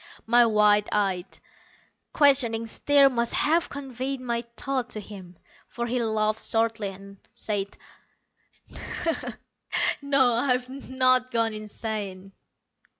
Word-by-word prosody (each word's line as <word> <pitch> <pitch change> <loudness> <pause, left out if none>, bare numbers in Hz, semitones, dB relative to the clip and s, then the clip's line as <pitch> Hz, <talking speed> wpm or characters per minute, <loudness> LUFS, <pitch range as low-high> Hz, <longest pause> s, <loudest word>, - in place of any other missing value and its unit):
My 235 +1 +5
wide 210 -1 +3
eyed, 195 -3 -1 0.7
questioning 255 -6 +3
stare 280 +5 +4
must 235 -3 +1
have 330 +3 +2
conveyed 270 -1 -5
my 235 -2 -2 0.2
thought 260 -3 -2
to 215 - -5
him, 190 -4 -11 0.3
for 235 - -4
he 245 +1 -1
laughed 215 -1 0
shortly, 225 -2 0
and 195 +1 -11 0.2
said, 200 -2 -3 2.2
"No, 275 -3 +3
I've 250 +1 +1 0.2
not 255 -1 +3
gone 230 -2 0
insane." 210 -3 -6
230 Hz, 105 wpm, -26 LUFS, 210-255 Hz, 2.2 s, My